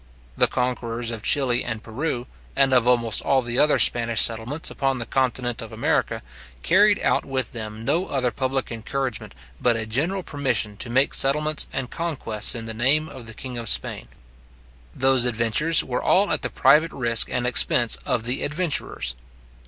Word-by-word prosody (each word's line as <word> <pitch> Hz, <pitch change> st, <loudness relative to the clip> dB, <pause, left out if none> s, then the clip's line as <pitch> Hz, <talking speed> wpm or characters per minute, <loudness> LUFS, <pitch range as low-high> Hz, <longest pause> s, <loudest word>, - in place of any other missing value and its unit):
The -, -, +4 dB
conquerors 120 Hz, -2 st, -3 dB
of 115 Hz, -2 st, -5 dB
Chili 125 Hz, 0 st, +1 dB
and 115 Hz, -2 st, -5 dB
Peru, 125 Hz, +1 st, -4 dB, 0.3 s
and 135 Hz, -1 st, +3 dB
of 125 Hz, -1 st, +3 dB
almost 115 Hz, -3 st, +2 dB
all 135 Hz, -2 st, +1 dB
the 120 Hz, +1 st, -2 dB
other 150 Hz, 0 st, +4 dB
Spanish 115 Hz, -2 st, +4 dB
settlements 115 Hz, +7 st, +1 dB
upon 135 Hz, -1 st, -1 dB
the 120 Hz, -, -4 dB
continent 125 Hz, -1 st, -1 dB
of 115 Hz, -1 st, -9 dB
America, 110 Hz, -, -1 dB, 0.4 s
carried 205 Hz, +3 st, +4 dB
out -, -, +1 dB
with 130 Hz, -1 st, -3 dB
them 110 Hz, -1 st, -7 dB
no 165 Hz, +8 st, 0 dB
other 125 Hz, -3 st, -1 dB
public 130 Hz, +2 st, -3 dB
encouragement, 120 Hz, -, -5 dB, 0.3 s
but 120 Hz, -1 st, +3 dB
a 110 Hz, 0 st, -3 dB
general 160 Hz, -, -2 dB
permission 130 Hz, -9 st, -2 dB
to 120 Hz, -, -5 dB
make 130 Hz, +4 st, +2 dB
settlements 150 Hz, +2 st, +1 dB
and 130 Hz, -2 st, -4 dB
conquests 130 Hz, -12 st, -1 dB
in 115 Hz, -1 st, -4 dB
the 110 Hz, -, -5 dB
name 140 Hz, +7 st, +1 dB
of 120 Hz, -3 st, -11 dB
the 110 Hz, -, -8 dB
king 125 Hz, -2 st, -7 dB
of 115 Hz, -2 st, -1 dB
Spain. -, -, -1 dB, 0.9 s
Those 130 Hz, -1 st, +4 dB
adventures 120 Hz, +7 st, +2 dB
were 125 Hz, -1 st, -3 dB
all 200 Hz, +2 st, +2 dB
at -, -, +3 dB
the -, -, -2 dB
private 150 Hz, +5 st, +3 dB
risk 115 Hz, -3 st, +1 dB
and 125 Hz, 0 st, -2 dB
expense 120 Hz, -1 st, +4 dB
of 115 Hz, -, -2 dB
the 125 Hz, +3 st, -1 dB
adventurers. 150 Hz, -, -2 dB
125 Hz, 175 wpm, -23 LUFS, 115-140 Hz, 0.9 s, The